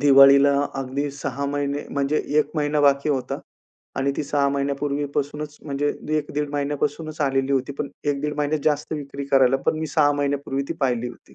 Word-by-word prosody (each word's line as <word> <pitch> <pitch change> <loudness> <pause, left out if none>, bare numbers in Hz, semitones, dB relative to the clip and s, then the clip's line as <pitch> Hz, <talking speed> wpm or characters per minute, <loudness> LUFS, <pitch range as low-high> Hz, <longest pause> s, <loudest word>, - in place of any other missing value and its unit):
दिवाळीला 140 0 +7 0.3
अगदी 140 +2 -2
6 140 0 -4
महिने 145 0 -2
म्हणजे 140 +2 0 0.2
1 150 -1 +2
महिना 150 0 +1
बाकी 140 +1 +3
होता, 135 -3 -2 0.6
आणि 140 +1 +1
ती - - -1
6 140 0 +1
महिन्यापूर्वीपासूनच 145 +1 -2
म्हणजे 145 0 -1 0.3
1 145 - -6
दीड 150 -1 -1
महिन्यापासूनच 145 +2 -2
आलेली 135 -1 +1
होती. 135 +1 0
पण 140 - -2 0.2
1 145 -2 0
दीड 150 0 -1
महिन्यात 150 +1 0
जास्त 150 0 0
विक्री 140 -1 -6
करायला, 135 -1 +5
पण 155 - +2
मी 160 - -2
6 145 -2 +3
महिन्यापूर्वी 140 -1 -1
ती - - -1
पाहिली 125 -3 0
होती. 120 - -15
140 Hz, 175 wpm, -23 LUFS, 140-145 Hz, 0.6 s, दिवाळीला